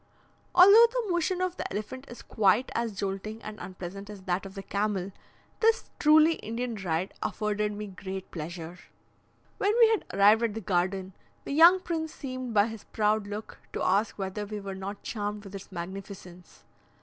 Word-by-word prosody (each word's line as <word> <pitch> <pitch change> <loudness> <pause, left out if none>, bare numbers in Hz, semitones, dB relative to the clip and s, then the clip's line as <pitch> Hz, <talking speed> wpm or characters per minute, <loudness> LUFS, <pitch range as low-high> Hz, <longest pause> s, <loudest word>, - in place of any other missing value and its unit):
Although 405 +6 +9
the - - -1
motion 350 +1 0
of 370 -1 -1
the - - -4
elephant 255 +6 -5
is 240 - -10
quite 215 +4 +2
as 230 -3 -2
jolting 200 +3 -4
and 215 0 -8
unpleasant 190 +2 -8
as 205 -2 -9
that 185 +1 -1
of 190 - -13
the 195 - -6
camel, 200 -1 -1 0.5
this 455 0 +2
truly 310 +2 +6
Indian 235 +2 -4
ride 185 -3 -2
afforded 210 -1 -1
me 210 +1 -5
great 190 -1 -7
pleasure. 170 +1 -7 0.8
When 410 +2 +2
we 460 -2 +7
had 445 -2 +1
arrived 205 +3 +5
at 230 -3 0
the - - -2
garden, 185 0 -1 0.3
the - - -4
young 340 +5 +7
prince 320 -3 -3
seemed 255 -3 -5
by 205 -2 +4
his 225 -2 -8
proud 210 -1 0
look 210 +1 -7
to - - -2
ask 200 +4 +1
whether 195 +1 -3
we 210 0 -5
were 195 -1 -6
not 195 +2 -7
charmed 210 -1 -4
with 195 -1 -11
its 195 0 -9
magnificence. 180 0 -9
210 Hz, 175 wpm, -28 LUFS, 195-250 Hz, 0.8 s, Although